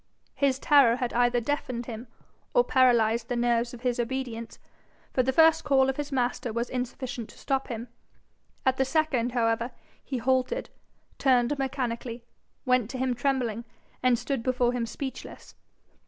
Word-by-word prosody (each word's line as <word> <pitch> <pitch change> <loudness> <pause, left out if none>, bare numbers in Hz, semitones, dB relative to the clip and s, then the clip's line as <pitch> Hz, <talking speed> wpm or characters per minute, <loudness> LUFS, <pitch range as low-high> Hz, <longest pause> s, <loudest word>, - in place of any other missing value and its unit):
His 275 -2 +1
terror 275 -5 +5
had 245 -1 -3
either 245 0 +3
deafened 245 -1 -3
him, 230 +1 -7 0.5
or - - +6
paralysed 235 - +3
the 245 - -1
nerves 235 0 +1
of 245 - -10
his 245 -1 -1
obedience, 240 -2 -4 0.6
for 255 - +3
the 260 +1 +1
first 320 +3 +5
call 270 -2 +3
of 265 - -12
his 290 -1 -4
master 245 -2 -1
was 235 +2 -3
insufficient 250 -2 -4
to - - -15
stop 270 -1 -1
him. 230 0 -5 0.8
At 260 0 +3
the 265 - +3
second, 265 -4 0
however, 230 0 +1 0.3
he 265 - -3
halted, 260 - 0 0.5
turned 255 0 +3
mechanically, 245 -3 -3 0.4
went 250 -4 +2
to 260 - -5
him 255 0 0
trembling, 245 -3 -1 0.4
and 255 -1 +3
stood 270 0 -2
before 250 0 +1
him 240 -2 -2
speechless. 265 +3 -7
250 Hz, 155 wpm, -27 LUFS, 235-265 Hz, 0.8 s, or